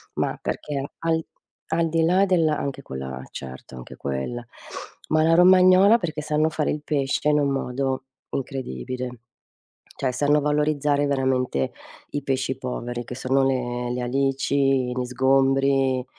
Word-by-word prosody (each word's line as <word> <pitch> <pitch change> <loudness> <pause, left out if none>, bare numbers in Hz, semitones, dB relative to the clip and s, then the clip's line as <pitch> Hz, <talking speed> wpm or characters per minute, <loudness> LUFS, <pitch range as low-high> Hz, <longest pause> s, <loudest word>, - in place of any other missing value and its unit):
ma - - -1
perché 140 -2 -3 0.2
al 160 -1 0 0.5
al 165 +1 +1
di 165 0 +1
là 185 +4 +4
della 165 -5 +2
anche 140 -1 -4
quella 65 - -6
eh - - -12
certo 65 0 -9
anche 60 -1 -10
quella, 70 - -4 0.7
ma 155 0 +3
la 165 +1 +4
romagnola 185 +4 +7
perché 160 -6 -3
sanno 155 +1 +1
fare 155 -1 -1
il 150 - -3
pesce 145 0 0
in 150 0 +3
un 140 -1 +1
modo 135 0 -2 0.3
incredibile. 130 - -4 0.9
Cioè 130 - 0
sanno 145 +4 +2
valorizzare 145 -1 +1
veramente 130 - 0 0.4
i 145 - -2
pesci 130 -1 -1
poveri 120 -2 -5
che 125 - -7
sono 135 +1 +1
le 125 -2 -1
le 125 - -3
alici, 135 0 +1
gli 125 0 -2
sgombri, 135 0 +2
135 Hz, 145 wpm, -24 LUFS, 125-150 Hz, 0.9 s, romagnola